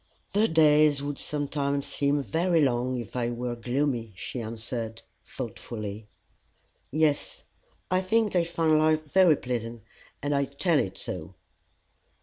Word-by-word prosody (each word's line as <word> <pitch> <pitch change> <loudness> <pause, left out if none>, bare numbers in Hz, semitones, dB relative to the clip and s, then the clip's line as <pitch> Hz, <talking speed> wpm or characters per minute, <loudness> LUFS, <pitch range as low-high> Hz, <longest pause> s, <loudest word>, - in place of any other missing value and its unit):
"The 210 +3 +4
days 150 -3 +4
would 145 0 -4
sometimes 140 -1 -1
seem 140 0 0
very 170 +3 +1
long 130 -2 +1
if 120 -2 -7
I 120 -1 0
were 120 0 -3
gloomy," 120 -2 -1
she 120 +6 -5
answered, 115 0 -5 0.2
thoughtfully. 105 -1 -6 0.8
"Yes, 150 0 0 0.5
I 185 0 +3
think 210 +2 +1
I 175 - +4
find 165 -2 +2
life 155 0 +3
very 185 -5 +6
pleasant, 120 -3 -4 0.4
and 145 0 0
I 140 0 +2
tell 145 +4 +1
it 95 - -2
so." 90 +1 -5
140 Hz, 135 wpm, -27 LUFS, 120-155 Hz, 0.8 s, very